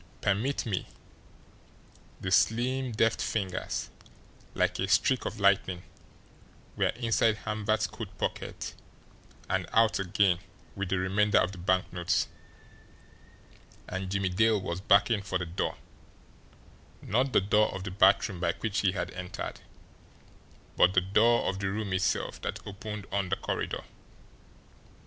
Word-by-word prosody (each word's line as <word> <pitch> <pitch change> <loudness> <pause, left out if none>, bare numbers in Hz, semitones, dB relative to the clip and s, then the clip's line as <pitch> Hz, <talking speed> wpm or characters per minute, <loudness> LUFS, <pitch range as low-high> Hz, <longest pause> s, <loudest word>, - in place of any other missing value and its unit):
Permit 110 +8 0
me" 100 -5 -2 1.3
the 95 - -4
slim, 125 +5 +2
deft 115 +1 +2
fingers, 95 -4 -2 0.6
like - - +1
a 95 - 0
streak 105 +7 +3
of 110 - -4
lightning, 95 -2 +2 0.9
were - - +2
inside 115 -2 +2
Hamvert's 110 0 0
coat - - -8
pocket - - -4 0.7
and - - -1
out 115 -2 +4
again 95 -1 +2 0.4
with 100 -2 -3
the 95 - +1
remainder 100 +3 +2
of 90 - +3
the 95 - -10
banknotes 90 -1 +1 1.6
and 95 0 -4
Jimmie 95 -1 0
Dale 110 +3 +3
was 90 -1 -4
backing 100 +2 +4
for 95 -1 -2
the 90 - -4
door 85 +1 -3 1.3
not 125 +5 +1
the - - +5
door 105 +2 +3
of 95 - -6
the 95 - -5
bathroom 95 0 +3
by 85 -1 +1
which 105 -1 -2
he 95 -3 +2
had 95 - -3
entered, 90 0 -6 1.2
but 90 +2 +5
the 95 - +5
door 110 +6 +3
of 95 - -1
the 95 -1 -1
room 100 -1 -3
itself 95 0 0
that - - -3
opened 105 +1 -6
on 100 -2 -1
the 95 - +2
corridor. - - -3
100 Hz, 135 wpm, -29 LUFS, 95-110 Hz, 1.6 s, the